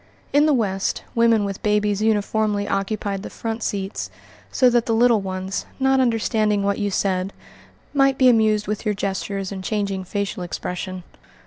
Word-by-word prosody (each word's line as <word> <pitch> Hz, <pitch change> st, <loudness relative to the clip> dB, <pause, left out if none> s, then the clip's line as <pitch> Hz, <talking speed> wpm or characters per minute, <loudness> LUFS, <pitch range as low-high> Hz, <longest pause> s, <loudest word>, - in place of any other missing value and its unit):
In 295 Hz, +2 st, +5 dB
the 305 Hz, -, +4 dB
West, 195 Hz, -5 st, -1 dB
women 230 Hz, -3 st, +3 dB
with 195 Hz, -1 st, -5 dB
babies 210 Hz, -1 st, +1 dB
uniformly 210 Hz, -1 st, +1 dB
occupied 195 Hz, 0 st, -2 dB
the -, -, -7 dB
front 225 Hz, 0 st, -4 dB
seats 195 Hz, -1 st, -3 dB, 0.4 s
so 255 Hz, -, +4 dB
that 240 Hz, -1 st, +2 dB
the 225 Hz, -, +2 dB
little 235 Hz, -2 st, +4 dB
ones, 190 Hz, 0 st, -4 dB
not 265 Hz, 0 st, +3 dB
understanding 220 Hz, -4 st, +1 dB
what 200 Hz, 0 st, 0 dB
you 205 Hz, -1 st, 0 dB
said, 190 Hz, -1 st, 0 dB, 0.6 s
might 275 Hz, -1 st, +3 dB
be 260 Hz, -, +5 dB
amused 215 Hz, -3 st, +4 dB
with 210 Hz, 0 st, -3 dB
your 210 Hz, -2 st, 0 dB
gestures 195 Hz, 0 st, -3 dB
and 190 Hz, -1 st, -6 dB
changing 200 Hz, -2 st, -2 dB
facial 200 Hz, 0 st, -3 dB
expression. 180 Hz, +1 st, -5 dB
210 Hz, 160 wpm, -22 LUFS, 195-225 Hz, 0.6 s, In